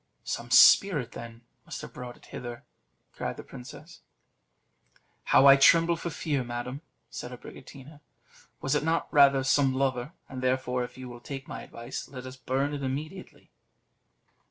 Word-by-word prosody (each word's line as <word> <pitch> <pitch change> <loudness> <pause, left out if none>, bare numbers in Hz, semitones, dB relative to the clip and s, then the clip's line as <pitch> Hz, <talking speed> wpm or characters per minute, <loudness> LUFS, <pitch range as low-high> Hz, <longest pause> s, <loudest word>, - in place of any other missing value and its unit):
"Some - - -4
spirit, 150 - +6
then, 115 0 -9 0.2
must - - -8
have - - -10
brought 125 -1 -8
it - - -20
hither," 120 -1 -8 0.5
cried - - -4
the - - -8
princess. 60 - -12 1.2
"How 135 - +5
I 135 0 +9
tremble 165 +4 +5
for 170 - -5
fear, 145 -5 -2
madam!" 120 +3 -5 0.3
said 120 - -6
Abricotina. 135 +3 -12 0.6
"Was 135 - 0
it 150 - +1
not 165 +1 -1
rather 140 -2 +6
some 135 0 +2
lover? 130 +1 -1
And 130 -1 -7
therefore, 125 -1 0
if 125 +1 -9
you 130 -1 -8
will 120 -1 -10
take 135 +2 -7
my - - -7
advice, 120 +2 -7
let 130 -2 -9
us 130 0 -8
burn 135 +3 -2
it 145 - -4
immediately." 150 +8 -6
130 Hz, 155 wpm, -28 LUFS, 125-145 Hz, 1.2 s, I